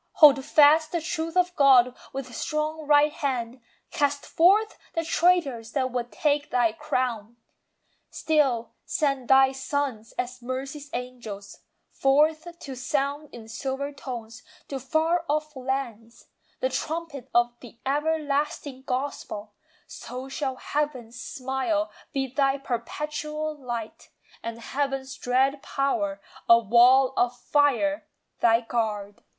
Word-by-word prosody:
Hold 285 -3 +7
fast 305 +2 +5
the 345 - 0
truth 325 +1 -3
of 360 0 +2
God 255 -3 +6 0.2
with 260 -2 -6
strong 305 +2 -2
right 295 0 +5
hand, 250 -4 -3 0.3
Cast 285 -1 0
forth 405 +6 +4 0.2
the 330 0 0
traitors 290 -11 +2
that 260 -2 0
would 245 -1 -3
"take 290 -1 0
thy 240 -3 +2
crown." 240 -6 -2 0.7
Still 275 -7 +1
send 275 -6 -1
thy 265 0 +6
sons, 265 -4 -3
as 250 0 -4
Mercy's 270 +4 -5
angels, 235 -5 -7 0.3
forth 305 +4 +2
To 270 - -7
sound 280 +3 -2
in 225 -2 -11
silver 270 +4 -4
tones, 245 -4 -7 0.3
to 275 - -3
far 320 +6 +1
off 305 0 -1
lands, 250 -4 -4 0.4
The - - +1
trumpet 315 - -4
of 240 0 +4
the 235 -2 -13
everlasting 290 -2 -1
gospel; 250 -6 -4 0.3
So 255 +1 -8
shall 270 -1 -3
Heaven's 255 -5 -3
smile 265 +5 -2 0.2
be 270 -3 -1
thy 270 +1 +1
perpetual 300 +4 -4
light, 240 -5 -6 0.3
And 230 0 -5
Heaven's 270 +2 -3
dread 265 +3 +1
power, 205 -10 -1 0.3
"a 230 - +10
wall 245 +4 +5
of 245 0 +1
fire," 290 +2 +1 0.3
thy 230 0 +4
guard. 215 -4 -3
270 Hz, 125 wpm, -26 LUFS, 245-300 Hz, 0.7 s, a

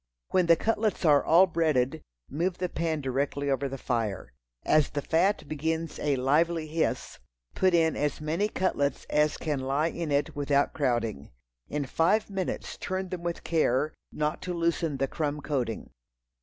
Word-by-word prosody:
When 180 -2 +2
the 170 - +7
cutlets 215 0 0
are 145 -2 +5
all 170 +4 +6
breaded, 155 -4 +1 0.3
move 175 +5 -1
the 180 -1 -2
pan 160 -3 -1
directly 140 +1 -1
over 135 +1 0
the 135 - -5
fire. 110 - -2 0.3
As 155 -1 +4
the 145 - -3
fat 170 -1 +1
begins 160 +2 -2
a 145 -2 +1
lively 155 +5 +2
hiss, 160 +1 -2 0.3
put 185 -2 +3
in 160 -2 +3
as 145 -1 -1
many 165 +7 0
cutlets 145 -9 -1
as 150 0 +2
can 150 -4 -2
lie 140 +5 0
in 165 -2 -4
it 140 +1 0
without 145 -1 +1
crowding. 120 - -1 0.4
In 145 -1 -2
five 200 +10 +1
minutes 190 -2 -3
turn 185 0 -3
them 180 -1 -5
with 170 0 -4
care, 155 -2 +1 0.2
not 150 +2 -2
to 180 -1 -4
loosen 165 -3 0
the 135 +1 0
crumb 150 +1 -2
coating. 135 -6 -3
155 Hz, 165 wpm, -28 LUFS, 140-170 Hz, 0.4 s, the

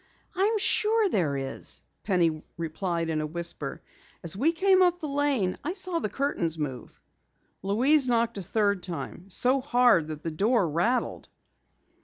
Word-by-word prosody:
"I'm 405 +4 +2
sure 435 0 +2
there 155 - 0
is," 135 0 -3 0.2
Penny 170 -6 +1 0.2
replied 170 0 -2
in 155 -1 -1
a 155 - -2
whisper. 170 -3 -4 0.4
"As 170 0 +1
we 280 +11 +2
came 375 +3 +3
up 355 -1 +3
the 310 - -4
lane, 280 -10 +1
I 340 - -2
saw 370 -3 -2
the 215 - -2
curtains 185 - -2
move." 135 -5 -6 0.6
Louise 255 +8 +3
knocked 230 -3 +1
a - - -4
third 200 +1 0
time, 170 +2 -7
so 255 +8 +3
hard 245 - +3
that 155 -1 -7
the 165 - -3
door 205 +4 +2
rattled. 175 +11 -1
205 Hz, 155 wpm, -27 LUFS, -, 0.6 s, came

